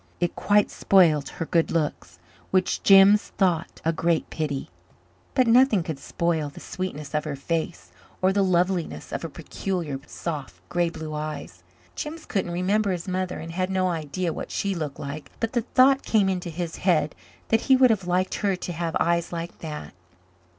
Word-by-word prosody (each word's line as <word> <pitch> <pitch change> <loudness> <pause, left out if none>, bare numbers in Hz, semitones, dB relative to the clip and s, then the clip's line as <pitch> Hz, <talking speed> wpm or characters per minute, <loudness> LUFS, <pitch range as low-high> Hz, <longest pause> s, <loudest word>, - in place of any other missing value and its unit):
It 175 -1 0
quite 205 0 +3
spoilt 165 -7 +4
her 165 - -2
good 165 0 +2
looks, 145 - -2 0.3
which 185 -1 +1
Jims 195 +1 +7
thought 180 -3 0
a 165 - +2
great 165 0 0
pity; 145 - -3 0.6
but 255 - +4
nothing 230 -5 +5
could 160 -4 -5
spoil 160 0 -1
the 140 - -12
sweetness 160 -6 -5
of 150 0 0
her 150 -2 -4
face 165 +4 -3 0.3
or 190 +1 +3
the 200 - +2
loveliness 180 -2 0
of - - -2
her 165 - -5
peculiar 165 -2 -4
soft, 150 -6 -5
grey 175 -1 +1
blue 160 -2 -7
eyes. 150 0 -5 0.3
Jims 315 +1 -6
couldn't 195 -3 -1
remember 195 +4 +1
his 175 -1 -4
mother 185 0 -2
and 165 - -7
had 185 +2 -1
no 185 -1 +1
idea 165 +1 -2
what - - -6
she 200 -1 -1
looked 155 -5 -4
like, 140 0 -6
but 225 +1 -2
the 240 - +2
thought 265 +3 +4
came 205 -4 +2
into 180 -2 -2
his 165 0 -4
head 160 -5 +2 0.4
that 225 - +3
he 265 - +8
would 255 -2 +6
have 195 -5 -1
liked 180 +1 +1
her 200 -2 +2
to 180 -1 -5
have 165 0 -1
eyes 170 0 +1
like 170 0 -5
that. 155 -2 -7
175 Hz, 180 wpm, -25 LUFS, 160-190 Hz, 0.6 s, he